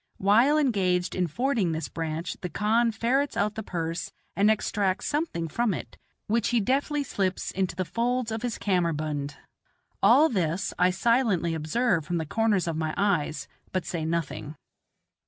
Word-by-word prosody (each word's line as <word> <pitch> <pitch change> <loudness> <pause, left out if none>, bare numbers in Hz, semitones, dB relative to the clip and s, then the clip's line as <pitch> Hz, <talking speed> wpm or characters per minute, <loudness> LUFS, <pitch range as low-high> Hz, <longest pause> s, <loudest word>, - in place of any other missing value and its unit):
While 230 +10 +4
engaged 190 -10 +1
in 180 -1 0
fording 225 - 0
this 160 -1 -3
branch 165 +2 -4
the 180 - -3
khan 225 +5 +2
ferrets 250 +6 0
out 210 +1 +1
the 220 - -5
purse 165 -4 -4 0.2
and 205 +2 +4
extracts 205 -3 0
something 295 - -1
from 215 +4 0
it, - - -8 0.3
which 225 0 +1
he 240 - +3
deftly 280 +6 0
slips 195 -7 -2
into 190 -2 -1
the 185 +1 -2
folds 240 +3 -1
of 220 0 -3
his 245 -3 -2
kammerbund. 155 -6 -1 0.7
All 310 +3 +6
this 185 - -1
I 180 - +5
silently 195 -3 +2
observe 165 +4 +1
from 175 - -1
the 160 - -2
corners 210 0 +1
of 165 - -1
my 155 -1 -2
eyes, 180 -6 0 0.2
but 185 -1 -2
say 170 -3 -3
nothing. 160 -2 -3
195 Hz, 160 wpm, -27 LUFS, 170-230 Hz, 0.7 s, All